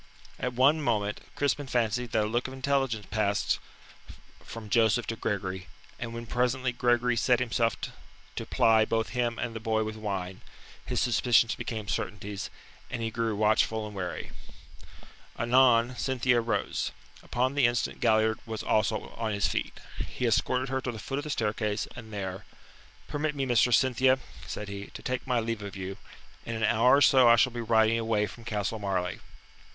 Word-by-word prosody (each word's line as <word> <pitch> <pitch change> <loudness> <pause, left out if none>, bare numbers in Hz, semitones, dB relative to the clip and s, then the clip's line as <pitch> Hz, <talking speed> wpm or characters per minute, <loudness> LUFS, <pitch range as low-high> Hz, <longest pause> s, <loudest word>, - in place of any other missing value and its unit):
At 125 0 -2
one 140 +6 +4
moment 105 -6 0
Crispin 145 0 0
fancied 120 -1 0
that 110 - +2
a - - -1
look 120 +4 -1
of 130 - -8
intelligence 135 -5 0
passed 105 -1 +1 0.8
from 115 -2 -8
Joseph 110 +1 +3
to 115 - -3
Gregory, 95 -4 -3 0.3
and 115 -1 -4
when 115 0 -6
presently 125 +2 0
Gregory 120 0 +2
set 120 +1 +3
himself 115 -2 +1 0.6
to - - -4
ply 110 -1 +4
both 110 0 0
him 120 -2 -1
and 120 -1 -3
the - - -3
boy 110 0 0
with 110 0 -4
wine, 95 -4 -4 0.4
his - - -2
suspicions 120 -1 +3
became 110 -3 -5
certainties, 100 +1 -4 0.4
and 115 -2 -4
he 115 - -2
grew 115 -1 -1
watchful 110 +1 +2
and 105 -1 -8
wary. 90 -2 -5 1.1
Anon 120 0 +4
Cynthia 125 -2 +2
rose. 115 -3 -1 0.3
Upon 130 +2 0
the 140 -4 +4
instant 120 0 -1
Galliard 110 0 +3
was 110 -1 -4
also 110 0 +1
on 110 -2 -1
his 100 -1 +1
feet. - - -3 0.3
He 125 - -3
escorted 125 +3 +1
her 130 0 -1
to 125 - -3
the 115 - -8
foot 135 +5 -4
of 145 - -6
the - - -5
staircase, 105 -4 -1
and 110 -3 -10
there: 95 -1 -5 0.6
"Permit 150 +1 -2
me, 135 -1 -1
Mistress 120 -1 +4
Cynthia," 130 0 +3 0.3
said 105 - -5
he, 100 0 -6
"to - - -8
take 130 +1 -3
my 125 -2 +2
leave 115 -1 -3
of 100 -1 -7
you. 95 0 -5 0.5
In 115 - -4
an 110 - -3
hour 120 +4 +5
or 140 - +3
so 130 -4 +7
I 115 - +8
shall 120 +2 +3
be 120 - -3
riding 110 0 +3
away 110 -2 +1
from 115 +2 -11
Castle 105 -1 -2
Marleigh." 95 -3 -2
115 Hz, 180 wpm, -28 LUFS, 105-125 Hz, 1.1 s, I